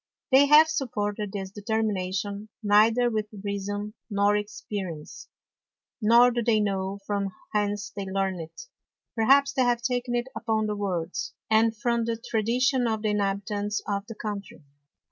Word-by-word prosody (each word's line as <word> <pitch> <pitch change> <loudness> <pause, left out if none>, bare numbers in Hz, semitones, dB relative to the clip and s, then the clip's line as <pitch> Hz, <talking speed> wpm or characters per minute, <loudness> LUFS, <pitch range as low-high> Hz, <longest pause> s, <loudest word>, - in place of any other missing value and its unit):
They 275 +2 +7
have 300 +2 +8
supported 210 -8 -2
this 195 -2 -5
Determination 205 -1 -2
neither 220 +4 +4
with 215 -1 -1 0.2
Reason 205 +1 -3 0.2
nor 205 0 +2
Experience; 200 -6 -5 0.7
nor 235 +3 +6
do 240 0 -1
they 225 -2 +3
know 195 -1 -1
from 200 -1 -1 0.2
whence 205 -1 -1
they 200 - -5
learnt 190 -1 -1
it; 165 - -9 0.5
perhaps 275 +5 +4
they 260 - +1
have 240 -1 +2
taken 245 -1 -1
it 240 +1 -1
upon 220 -2 0
the 210 0 -2
Words, 185 -4 -3 0.2
and 220 0 +3
from 235 +1 0
the 230 0 -1
Tradition 245 +2 +1
of 220 -1 -2
the 215 - +1
Inhabitants 205 0 -1
of 200 -1 -2
the 225 - -8
Country. 205 -6 -6
210 Hz, 145 wpm, -26 LUFS, 200-235 Hz, 0.7 s, have